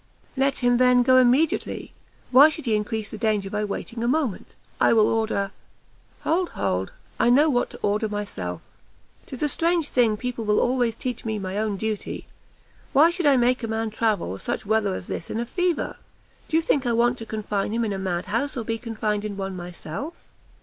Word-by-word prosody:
"Let 270 Hz, 0 st, +1 dB
him, 245 Hz, 0 st, +4 dB
then, 250 Hz, 0 st, +5 dB
go 255 Hz, +1 st, +5 dB
immediately; 255 Hz, +6 st, +1 dB, 0.4 s
why 275 Hz, +4 st, +8 dB
should 315 Hz, -1 st, -6 dB
he 230 Hz, -, +1 dB
increase 210 Hz, 0 st, -3 dB
the 215 Hz, -, -7 dB
danger 210 Hz, -3 st, 0 dB
by 210 Hz, 0 st, -1 dB
waiting 230 Hz, +3 st, -5 dB
a -, -, +1 dB
moment? 265 Hz, -6 st, -1 dB, 0.2 s
I -, -, +5 dB
will 220 Hz, -2 st, +5 dB
order 220 Hz, -3 st, 0 dB, 0.4 s
" -, -, -34 dB
"Hold, 345 Hz, +3 st, +1 dB
hold! 95 Hz, +1 st, -1 dB, 0.3 s
I -, -, +4 dB
know 290 Hz, +5 st, +5 dB
what 245 Hz, -2 st, +1 dB
to -, -, -11 dB
order 210 Hz, +2 st, +1 dB
myself! 95 Hz, -, -4 dB, 0.7 s
'Tis 260 Hz, +2 st, -5 dB
a -, -, +3 dB
strange 330 Hz, +1 st, +1 dB
thing 230 Hz, -4 st, +2 dB
people 250 Hz, 0 st, -4 dB
will 210 Hz, -1 st, +2 dB
always 245 Hz, -2 st, +1 dB
teach 250 Hz, 0 st, -4 dB
me 220 Hz, -1 st, -2 dB
my 190 Hz, -1 st, -4 dB
own 210 Hz, -1 st, -1 dB
duty! 215 Hz, 0 st, -4 dB, 0.7 s
why 310 Hz, +5 st, +6 dB
should 345 Hz, -3 st, 0 dB
I 275 Hz, -2 st, +6 dB
make 250 Hz, +1 st, +2 dB
a 230 Hz, -, -3 dB
man 220 Hz, 0 st, -2 dB
travel 210 Hz, -, -1 dB
such -, -, -3 dB
weather 210 Hz, -2 st, +1 dB
as -, -, -6 dB
this 165 Hz, -, -5 dB
in 225 Hz, -, -2 dB
a 235 Hz, -, -1 dB
fever? 355 Hz, +4 st, -1 dB, 0.5 s
do 320 Hz, -, +1 dB
you 330 Hz, -, +2 dB
think 275 Hz, -5 st, +1 dB
I 235 Hz, -, +2 dB
want 240 Hz, +1 st, +2 dB
to 225 Hz, -, -6 dB
confine 210 Hz, -2 st, -2 dB
him 230 Hz, +1 st, 0 dB
in 210 Hz, -, -2 dB
a 195 Hz, -, -4 dB
mad 180 Hz, -2 st, -2 dB
house, 245 Hz, +8 st, -2 dB
or 235 Hz, -, -2 dB
be 225 Hz, +1 st, -3 dB
confined 215 Hz, -3 st, -2 dB
in 205 Hz, -2 st, -5 dB
one 195 Hz, -1 st, -4 dB
myself?" 180 Hz, -, -7 dB
225 Hz, 205 wpm, -24 LUFS, 210-255 Hz, 0.7 s, why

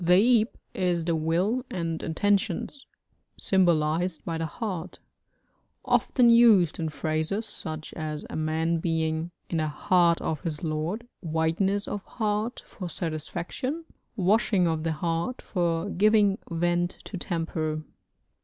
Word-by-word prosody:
The 210 Hz, +7 st, +6 dB
ab 220 Hz, -, -2 dB, 0.2 s
is 175 Hz, -3 st, 0 dB
the 170 Hz, -1 st, +1 dB
will 175 Hz, +10 st, +1 dB
and 165 Hz, -3 st, -3 dB
intentions, 200 Hz, -, 0 dB, 0.5 s
symbolised 170 Hz, -2 st, +2 dB
by 165 Hz, -1 st, -2 dB
the 165 Hz, -, -1 dB
heart; 185 Hz, -3 st, -5 dB, 0.9 s
often 240 Hz, -2 st, +4 dB
used 220 Hz, -9 st, +6 dB
in 160 Hz, -1 st, -1 dB
phrases, 160 Hz, +8 st, -1 dB
such 155 Hz, -7 st, -7 dB
as 155 Hz, -2 st, -4 dB
a -, -, -7 dB
man 160 Hz, +1 st, 0 dB
being 160 Hz, 0 st, -1 dB, 0.2 s
'in 170 Hz, -, 0 dB
the 155 Hz, -1 st, +1 dB
heart 170 Hz, +2 st, +3 dB
of 155 Hz, -, -2 dB
his 160 Hz, -3 st, -4 dB
lord,' 165 Hz, +9 st, -2 dB
'wideness 165 Hz, +5 st, 0 dB
of 205 Hz, -, -4 dB
heart' 215 Hz, +1 st, -2 dB
for 185 Hz, -6 st, -7 dB
satisfaction, 175 Hz, -, -4 dB, 0.3 s
'washing 200 Hz, -1 st, +3 dB
of 160 Hz, -2 st, 0 dB
the 165 Hz, 0 st, -1 dB
heart' 165 Hz, +9 st, -2 dB
for 170 Hz, -1 st, 0 dB
giving 205 Hz, 0 st, +4 dB
vent 175 Hz, +1 st, 0 dB
to -, -, -7 dB
temper. 160 Hz, -3 st, -2 dB
170 Hz, 130 wpm, -27 LUFS, 160-205 Hz, 0.9 s, The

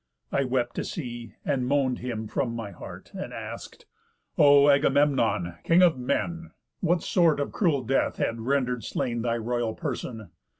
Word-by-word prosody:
I 140 Hz, -, +1 dB
wept 125 Hz, -1 st, -1 dB
to -, -, -1 dB
see, 120 Hz, -, -6 dB
and 130 Hz, -3 st, 0 dB
moan'd 135 Hz, -2 st, +1 dB
him 115 Hz, -3 st, -4 dB
from 115 Hz, +1 st, -2 dB
my 115 Hz, -3 st, -5 dB
heart, -, -, -11 dB
And -, -, -6 dB
ask'd: -, -, -8 dB, 0.5 s
'O 145 Hz, -1 st, +6 dB
Agamemnon! 135 Hz, -, +2 dB
King 170 Hz, +2 st, +5 dB
of 165 Hz, -7 st, +4 dB
men! 170 Hz, +7 st, -2 dB, 0.3 s
What 175 Hz, 0 st, +1 dB
sort 170 Hz, -5 st, +3 dB
of 145 Hz, -, -2 dB
cruel 155 Hz, -10 st, +1 dB
death 135 Hz, +3 st, +1 dB
hath 115 Hz, -, -1 dB
render'd 125 Hz, -1 st, 0 dB
slain 120 Hz, +2 st, -2 dB
Thy 115 Hz, 0 st, 0 dB
royal 120 Hz, -1 st, -2 dB
person? 125 Hz, -, -5 dB
130 Hz, 160 wpm, -26 LUFS, 115-145 Hz, 0.5 s, O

